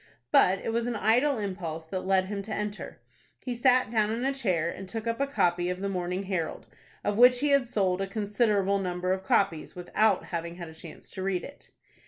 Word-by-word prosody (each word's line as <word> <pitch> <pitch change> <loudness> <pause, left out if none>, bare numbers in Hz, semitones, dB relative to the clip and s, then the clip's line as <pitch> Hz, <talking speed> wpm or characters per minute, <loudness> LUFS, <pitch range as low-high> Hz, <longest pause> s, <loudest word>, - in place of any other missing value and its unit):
But 185 +2 +5
it 225 - -1
was 235 +1 0
an 240 - -2
idle 245 +7 +3
impulse 180 -6 -4
that 185 +3 -5
led 190 -1 +3
him 200 +1 -4
to 215 +2 -8
enter. 210 0 -4 0.5
He 250 - -2
sat 250 -1 +3
down 215 -2 +2
in 230 +3 -2
a 275 - +1
chair, 185 -11 0
and 185 +2 -6
took 225 +1 -5
up 230 +1 -2
a 280 - +1
copy 175 -9 +1
of 180 0 -3
the 200 +1 -2
"Morning 180 0 -2
Herald," 185 -5 -3 0.4
of 205 0 -1
which 250 0 +7
he 295 - +2
had 280 -3 +3
sold 195 -5 0
a 195 - -1
considerable 205 -1 +1
number 180 -1 -1
of 190 - -3
copies, 190 -4 +1
without 185 +3 +1
having 170 0 -4
had 170 -2 -8
a - - -12
chance 160 0 -12
to 190 - -6
read 190 -2 -1
it. 285 - -11
200 Hz, 220 wpm, -28 LUFS, 180-230 Hz, 0.5 s, which